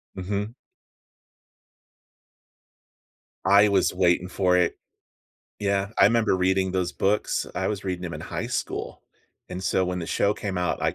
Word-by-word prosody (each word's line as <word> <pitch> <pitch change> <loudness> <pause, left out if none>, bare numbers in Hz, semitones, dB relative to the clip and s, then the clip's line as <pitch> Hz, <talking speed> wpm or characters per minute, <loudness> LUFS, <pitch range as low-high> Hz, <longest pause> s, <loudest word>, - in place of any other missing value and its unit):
Mhm. 100 +4 -3 2.9
I 100 +2 +6
was 100 - +2
waiting 90 0 +2
for 90 -1 +2
it. 90 -1 +1 0.8
Yeah, 100 -1 0
I - - +7
remember 115 -1 +3
reading 95 0 +1
those 90 -2 0
books; 105 +2 0
I - - -1
was 100 -2 -4
reading 90 -1 -3
'em 85 - -6
in - - -7
high - - -4
school, - - -4 0.5
and, 90 +1 -6
so 95 0 +1
when 90 0 -2
the 85 - -5
show 100 - +1
came 100 -3 -4
out, 90 -2 -1
I - - +1
95 Hz, 150 wpm, -25 LUFS, 90-100 Hz, 2.9 s, I